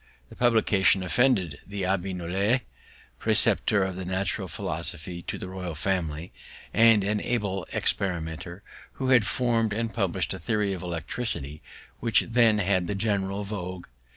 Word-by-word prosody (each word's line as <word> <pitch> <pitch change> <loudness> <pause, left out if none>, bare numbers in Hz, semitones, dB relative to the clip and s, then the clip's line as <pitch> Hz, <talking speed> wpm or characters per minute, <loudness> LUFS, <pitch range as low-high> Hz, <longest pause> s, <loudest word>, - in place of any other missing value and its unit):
The - - -12
publication 105 -5 +3
offended 90 - +2
the 100 -1 -5
Abbé 95 0 -1
Nollet, 95 +8 +1 0.6
preceptor 100 -3 +2
in 95 -1 -5
Natural 95 0 -1
Philosophy 85 +3 -5
to - - -5
the - - -6
royal 90 -3 -5
family, 85 -1 -2 0.4
and 115 -2 +6
an 105 +1 0
able 100 -7 -2
experimenter, 85 0 -2 0.3
who 130 -1 -2
had 120 -5 +5
form'd 115 -4 +1
and 115 +1 -2
publish'd 95 -6 0
a 95 - -6
theory 105 +1 0
of 95 - -5
electricity, 85 - -4 0.4
which 115 -2 +4
then 115 -2 +3
had 95 -3 +1
the 100 - -2
general 100 -1 -1
vogue. 90 -3 -5
95 Hz, 140 wpm, -27 LUFS, 90-110 Hz, 0.6 s, and